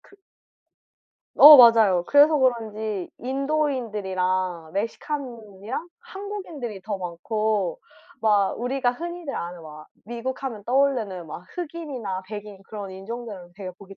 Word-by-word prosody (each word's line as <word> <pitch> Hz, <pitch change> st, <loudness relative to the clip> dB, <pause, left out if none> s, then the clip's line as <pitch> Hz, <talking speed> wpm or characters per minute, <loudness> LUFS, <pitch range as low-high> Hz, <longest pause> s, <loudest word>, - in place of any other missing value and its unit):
그 400 Hz, -, -21 dB, 1.2 s
어 300 Hz, +1 st, +11 dB
맞아요. 225 Hz, -8 st, +6 dB
그래서 295 Hz, +2 st, +6 dB
그런지 220 Hz, -6 st, -1 dB
인도인들이랑 210 Hz, -, -1 dB
멕시칸이랑 230 Hz, -, -5 dB
한국인들이 385 Hz, -, -7 dB
더 205 Hz, +1 st, -3 dB
많고 190 Hz, +1 st, -2 dB, 0.4 s
막 205 Hz, -3 st, +3 dB
우리가 245 Hz, +1 st, 0 dB
흔히들 345 Hz, +1 st, -6 dB
아는 175 Hz, 0 st, -6 dB
막 155 Hz, -1 st, -11 dB, 0.2 s
미국 240 Hz, +4 st, -5 dB
하면 230 Hz, -7 st, -5 dB
떠오르는 240 Hz, -9 st, 0 dB
막 175 Hz, +3 st, -9 dB
흑인이나 290 Hz, -, -5 dB
백인 205 Hz, -1 st, -8 dB
그런 200 Hz, -1 st, -8 dB
인종들은 195 Hz, -2 st, -8 dB
되게 190 Hz, -1 st, -7 dB
보기 195 Hz, +2 st, -14 dB
220 Hz, 280 characters per minute, -24 LUFS, 190-270 Hz, 1.2 s, 어